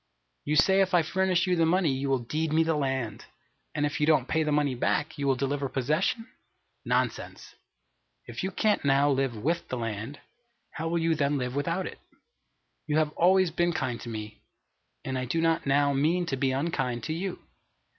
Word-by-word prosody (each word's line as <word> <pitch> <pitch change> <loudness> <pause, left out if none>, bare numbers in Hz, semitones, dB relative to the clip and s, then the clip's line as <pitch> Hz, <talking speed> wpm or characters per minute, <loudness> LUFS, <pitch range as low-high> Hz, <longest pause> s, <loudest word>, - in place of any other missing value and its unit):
You 150 - 0
say 190 +5 +5
if 185 -1 +2
I 170 - +4
furnish 185 +1 +1
you 180 -1 +1
the 165 - +2
money 175 -2 +2
you 135 +1 -2
will 135 - +3
deed 155 +4 -2
me 160 +1 +4
the 160 0 +1
land, 130 -7 -2 0.5
and 150 -1 +1
if 145 - -2
you 150 - +2
don't 150 -5 +3
pay 160 - +1
the 155 -1 0
money 145 -2 +2
back, 150 +5 -1
you 140 -1 -2
will 135 - +3
deliver 140 +1 -2
possession 155 - 0 0.6
Nonsense! - - -2 0.7
If - - -6
you 190 - -1
can't 210 +2 +1
now 140 +1 +3
live 135 -3 0
with 165 +10 -1
the 130 - -4
land, 115 +4 -5 0.5
how 160 +1 -4
will 170 +1 0
you 165 0 +2
then 145 -2 +1
live 125 -1 -3
without 165 +6 -1
it? - - -8 0.9
You 150 0 +1
have 155 -1 +2
always 185 +2 +3
been 175 +1 +1
kind 125 -5 -2
to 120 - -7
me, 110 -1 -7 0.6
and 130 -1 -2
I 125 - -2
do 145 +7 -1
not 165 -2 +1
now 140 +1 +3
mean 160 +6 +1
to 145 - -2
be 135 0 0
unkind 130 -4 -1
to 155 - -2
you. 180 +3 -3
150 Hz, 200 wpm, -28 LUFS, 135-165 Hz, 0.9 s, say